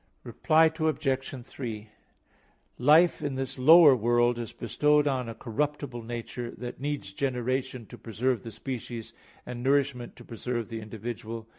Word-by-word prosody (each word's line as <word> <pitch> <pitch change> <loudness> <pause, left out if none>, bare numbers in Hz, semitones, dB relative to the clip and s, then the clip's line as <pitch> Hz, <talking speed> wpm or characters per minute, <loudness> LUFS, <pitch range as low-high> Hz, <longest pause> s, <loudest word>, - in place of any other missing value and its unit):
Reply 160 +1 +3
Obj. 135 -5 -1
3: 110 -4 -7 0.9
Life 155 +7 +5
in 145 -2 -2
this 135 0 -4
lower 155 +1 +8
world 120 +1 +2
is 115 -2 -5
bestowed 150 +6 +2
on 130 -4 -1
a 115 - -7
corruptible 135 +1 -3
nature, 120 +1 -6
that 120 -1 -7
needs 145 -7 -4
generation 130 0 -2
to - - -13
preserve 120 +1 -1
the 115 - -8
species, 115 -1 -6 0.3
and 125 -1 -6
nourishment 135 -2 0
to 120 - -14
preserve 120 -1 -4
the 115 -1 -5
individual. 110 +1 -6
125 Hz, 140 wpm, -28 LUFS, 115-140 Hz, 0.9 s, lower